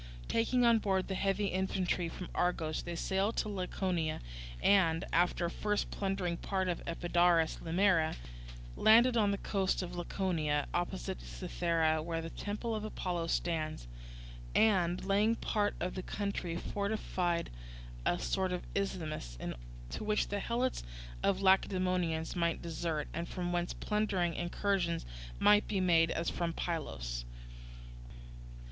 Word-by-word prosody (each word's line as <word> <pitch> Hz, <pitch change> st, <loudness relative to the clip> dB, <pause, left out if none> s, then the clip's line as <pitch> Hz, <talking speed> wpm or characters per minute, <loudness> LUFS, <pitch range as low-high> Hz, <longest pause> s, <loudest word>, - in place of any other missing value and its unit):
Taking 245 Hz, +2 st, +2 dB
on 230 Hz, -1 st, +6 dB
board 190 Hz, -3 st, 0 dB
the 195 Hz, -, -2 dB
heavy 195 Hz, +1 st, +1 dB
infantry 185 Hz, -2 st, 0 dB
from 180 Hz, +2 st, -7 dB
Argos 165 Hz, -3 st, 0 dB
they 175 Hz, -, -5 dB
sailed 195 Hz, +5 st, 0 dB
to -, -, 0 dB
Laconia, 180 Hz, -4 st, -1 dB, 0.4 s
and, 175 Hz, -3 st, +4 dB
after 175 Hz, 0 st, +2 dB
first 210 Hz, +4 st, -1 dB
plundering 190 Hz, -3 st, -1 dB
part 190 Hz, 0 st, -1 dB
of 175 Hz, -2 st, -1 dB
Epidaurus 170 Hz, -1 st, +2 dB
Limera, 170 Hz, -1 st, +2 dB, 0.6 s
landed 235 Hz, +3 st, +6 dB
on 210 Hz, -3 st, +4 dB
the 200 Hz, -, 0 dB
coast 195 Hz, -2 st, 0 dB
of 175 Hz, 0 st, -6 dB
Laconia, 165 Hz, -5 st, 0 dB
opposite -, -, -2 dB
Cythera, 160 Hz, -, 0 dB
where 165 Hz, +1 st, -2 dB
the 165 Hz, 0 st, -5 dB
temple 210 Hz, +3 st, -3 dB
of 215 Hz, -1 st, -2 dB
Apollo 180 Hz, -5 st, -2 dB
stands, 155 Hz, -, -1 dB, 0.7 s
and, 185 Hz, -5 st, +3 dB
laying 205 Hz, +3 st, +3 dB
waste -, -, -7 dB
part 205 Hz, -1 st, +1 dB
of 180 Hz, -, -2 dB
the 185 Hz, -, -4 dB
country, 200 Hz, -3 st, -3 dB
fortified 190 Hz, -4 st, -1 dB, 0.5 s
a -, -, +2 dB
sort 190 Hz, -1 st, 0 dB
of 180 Hz, -1 st, -2 dB
isthmus, 160 Hz, -, -3 dB, 0.5 s
to -, -, -4 dB
which 210 Hz, 0 st, +1 dB
the 205 Hz, -, -1 dB
Helots 240 Hz, +5 st, -1 dB, 0.4 s
of 200 Hz, -1 st, +2 dB
the 195 Hz, -, -6 dB
Lacedaemonians 185 Hz, -4 st, +2 dB
might 170 Hz, -1 st, +1 dB
desert, 160 Hz, -2 st, -2 dB
and 170 Hz, 0 st, -3 dB
from 175 Hz, -1 st, -3 dB
whence 175 Hz, 0 st, 0 dB
plundering 200 Hz, -5 st, 0 dB
incursions 175 Hz, 0 st, -1 dB, 0.3 s
might 210 Hz, 0 st, +5 dB
be 200 Hz, -, 0 dB
made 165 Hz, -3 st, +4 dB
as 165 Hz, 0 st, -2 dB
from 170 Hz, -1 st, -1 dB
Pylos. -, -, -3 dB
180 Hz, 140 wpm, -33 LUFS, 165-200 Hz, 0.7 s, on